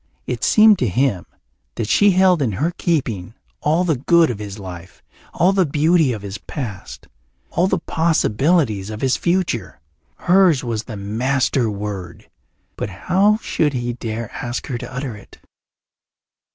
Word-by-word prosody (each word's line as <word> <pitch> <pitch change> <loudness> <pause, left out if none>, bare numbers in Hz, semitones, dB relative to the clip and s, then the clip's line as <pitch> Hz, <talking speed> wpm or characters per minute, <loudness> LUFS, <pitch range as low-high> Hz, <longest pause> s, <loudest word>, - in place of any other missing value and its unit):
It - - -4
seemed 215 -3 +6
to 125 - +1
him 110 -2 0 0.5
that 110 - -3
she 205 - +4
held 185 -3 +4
in 120 -7 0
her 150 - -1
keeping 120 - -2 0.3
all 160 +4 +2
the 160 -6 +1
good 165 +3 +3
of 110 - -6
his 105 -1 -7
life, 90 -3 -10 0.3
all 180 +4 +2
the 195 -1 +3
beauty 155 -1 +2
of 105 -4 -5
his 100 0 -6
past, 120 -10 -7 0.4
all 175 +2 +2
the 190 - +1
possibilities 155 - +1
of 110 0 -7
his 135 -1 +2
future. 170 - -1 0.4
Hers 180 -5 +3
was 115 -3 -3
the 110 -4 -7
master 120 +4 0
word, 100 -5 -6 0.5
but - - -3
how 195 - +2
should 150 -2 0
he 120 -1 -2
dare 115 -1 -5
ask 120 0 -5
her 125 - -4
to - - -8
utter 130 -3 -5
it? 105 - -15
130 Hz, 155 wpm, -20 LUFS, 105-170 Hz, 0.5 s, seemed